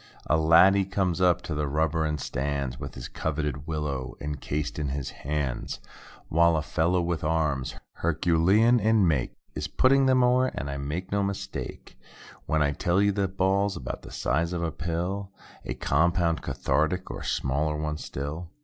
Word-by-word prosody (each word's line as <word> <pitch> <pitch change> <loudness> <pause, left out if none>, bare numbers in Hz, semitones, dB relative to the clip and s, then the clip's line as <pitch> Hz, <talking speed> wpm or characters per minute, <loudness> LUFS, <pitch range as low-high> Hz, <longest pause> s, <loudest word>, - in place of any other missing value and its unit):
A - - +2
laddie 90 +5 +6
comes 95 -2 -1
up 90 -1 +3
to 80 - -4
the 75 0 -1
rubber 80 +2 +1
and 75 -1 -1
stands 70 -2 -2
With - - -7
his - - -6
coveted 75 -2 -3
willow 75 -5 -3
encased 75 +1 -3
in 75 - -1
his 70 -1 -3
hands. 70 -3 -3 0.5
While 85 0 +4
a 75 - -1
fellow 85 +6 +1
with 85 -2 -2
arms—Herculean 80 - +2 0.3
make. 70 -7 0 0.2
Is - - -3
putting 135 +1 +4
them 130 -1 +4
o'er; 125 +1 +4
and 70 0 -3
I 70 - -4
make 75 +7 -4
no 100 0 +1
mistake 100 0 -5 0.5
When 80 -1 +2
I 70 - +2
tell 85 +5 +1
you 100 0 +4
that 95 -1 -2
ball's 95 +1 +2
'bout 60 - -5
the - - -11
size 85 +7 -1
of 85 -1 -2
a 80 - -1
pill— 90 +5 -3 0.4
A - - -3
compound 85 +2 +1
cathartic—or 90 +5 -1
smaller 75 +3 -1
one 75 0 -2
still. 75 +6 -5
80 Hz, 160 wpm, -27 LUFS, 75-90 Hz, 0.5 s, laddie